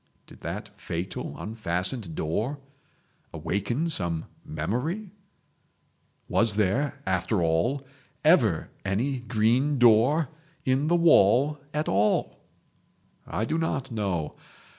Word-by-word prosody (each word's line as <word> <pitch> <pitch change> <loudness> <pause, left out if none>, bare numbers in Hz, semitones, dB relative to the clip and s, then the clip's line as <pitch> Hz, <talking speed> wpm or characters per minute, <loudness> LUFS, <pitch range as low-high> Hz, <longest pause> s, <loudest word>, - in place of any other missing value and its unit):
Did - - -16
that - - -5
fatal 85 +3 -4
unfastened 95 -2 -3
door 110 - -1 0.7
awaken 120 - -1
some 85 - 0 0.2
memory? 135 - -3 1.2
Was 115 -3 +3
there, 125 +8 +1
after 95 +1 0
all, 85 +13 +1 0.4
ever 120 - +4
any 120 +8 -1
green 120 +5 +2
door 125 +6 +5 0.4
in 135 +3 +2
the 170 - +3
wall 150 - +5
at 150 +1 -2
all? 100 +2 +1 0.9
I 110 - -1
do 160 +7 -1
not 135 -5 -2
know. 95 -8 -2
115 Hz, 100 wpm, -27 LUFS, 95-140 Hz, 1.2 s, door